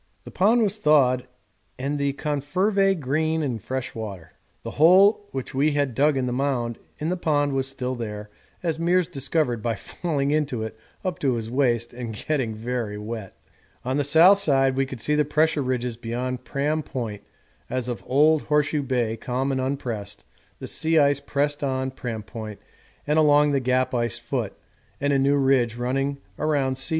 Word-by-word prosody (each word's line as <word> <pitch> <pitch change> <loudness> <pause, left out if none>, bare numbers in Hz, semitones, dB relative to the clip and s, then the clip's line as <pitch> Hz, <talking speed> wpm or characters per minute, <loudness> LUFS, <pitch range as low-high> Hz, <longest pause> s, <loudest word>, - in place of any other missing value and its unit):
The - - -10
pond 225 +5 +3
was 210 0 0
thawed 130 -6 +3 0.5
and 140 +3 -2
the 140 -1 0
#confervae 185 +8 +1
green 155 +3 0
in 125 -6 -2
fresh 130 +5 -4
water. 100 -7 -7 0.3
The - - -5
hole 195 +5 +6
which 130 -2 -5
we 145 +3 +2
had 145 -3 0
dug 145 +3 +3
in 130 - 0
the 125 - -2
mound 125 -3 -1 0.2
in 155 +2 -2
the 180 - 0
pond 145 -5 +1
was 135 -1 0
still 130 -1 -3
there, 105 -3 -6 0.3
as 165 -2 -1
Meares 175 +1 +2
discovered 135 -3 -1
by 115 0 -1
falling 145 - -2
into 145 -7 0
it 110 0 -6 0.3
up 180 -5 -2
to 130 -4 +1
his 115 -1 -4
waist 120 -3 +1
and 120 -3 -6
getting 125 -1 -2
very 115 -2 -3
wet. 105 -2 -7 0.5
On 130 +2 0
the 145 - +2
south 170 +8 +6
side 135 -7 +3
we 135 0 +1
could 130 -3 -8
see 150 - +1
the 150 0 +3
Pressure 150 +1 +2
Ridges 125 -2 -2
beyond 125 +2 -4
Pram 145 +5 -1
Point 115 -8 -5 0.5
as 130 -1 -2
of 120 -2 -4
old 150 +3 +4
Horseshoe 150 0 +1
Bay 120 -4 -1
calm 130 +4 -2
and 130 -1 0
unpressed 115 -7 -4 0.3
the - - -7
sea 160 +1 +1
ice 140 -2 +4
pressed 145 +1 -1
on 130 -1 -1
Pram 115 -4 -5
Point 110 -1 -8 0.5
and 150 +2 +2
along 150 -1 +5
the 140 - +2
Gap 130 0 +1
ice 120 -3 0
foot, - - -3 0.5
and 145 0 +1
a 135 - +3
new 140 +1 +3
ridge 130 -4 +2
running 135 +3 -1 0.2
around 140 -4 0
C. 135 - +1
135 Hz, 180 wpm, -24 LUFS, 120-150 Hz, 0.5 s, hole